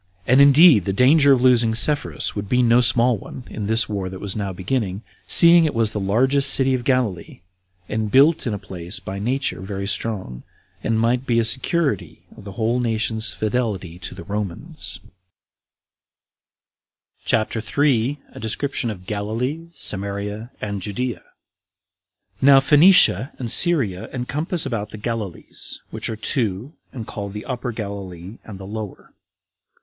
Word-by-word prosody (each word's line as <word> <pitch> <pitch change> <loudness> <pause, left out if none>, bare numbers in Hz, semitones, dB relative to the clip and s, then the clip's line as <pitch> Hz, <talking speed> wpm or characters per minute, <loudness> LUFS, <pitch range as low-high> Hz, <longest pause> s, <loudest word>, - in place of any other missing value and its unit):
And 130 +5 +4
indeed 140 - +6
the 95 - -2
danger 140 +6 +4
of 130 -2 +3
losing 120 -3 +4
Sepphoris 145 +5 0
would 100 -1 -5
be 125 0 +2
no 120 +1 +4
small 120 0 +3
one, 125 - -11
in 105 -2 -5
this 110 +1 +3
war 100 -3 -4
that 95 0 -9
was 100 -2 0
now 100 -3 -3
beginning, 100 +1 -3 0.2
seeing 170 0 +8
it 155 - -2
was 115 -2 0
the 105 - -4
largest 130 +8 +4
city 135 -1 +4
of 125 -1 -2
Galilee, 120 -10 -2 0.5
and 110 -1 -3
built 140 +4 +3
in 115 - -2
a - - -4
place 90 -1 -6
by 95 +1 -7
nature 130 +1 -2
very 100 0 -6
strong, 100 - -3 0.4
and 110 0 0
might 120 +3 0
be 115 - +1
a 115 - +2
security 135 - -1
of - - -15
the 100 - -9
whole 115 +4 -1
nation's 110 -1 -2
[fidelity 105 -6 -3
to - - -6
the - - -10
Romans]. 100 -3 -6 2.2
CHAPTER 110 0 -1
3. 135 +2 0
A - - -12
Description 120 +3 -2
Of 95 -4 -8
Galilee, 115 - -4
Samaria, 100 +3 -4
And 100 -2 -5
Judea. 105 +1 -4 1.2
1. - - -30
Now 135 -1 +8
Phoenicia 145 - +5
and 120 -3 -4
Syria 135 - +3
encompass 150 +7 -2
about 110 -6 -4
the 110 - -10
Galilees, 110 -4 -6
which - - -6
are 110 - -4
two, 110 - -3 0.2
and 120 -4 -8
called 100 -2 -7
the 105 - -8
Upper 125 -1 -4
Galilee 100 -2 -8
and 100 -4 -11
the 95 - -9
Lower. 105 0 -8
110 Hz, 155 wpm, -21 LUFS, 100-130 Hz, 2.2 s, seeing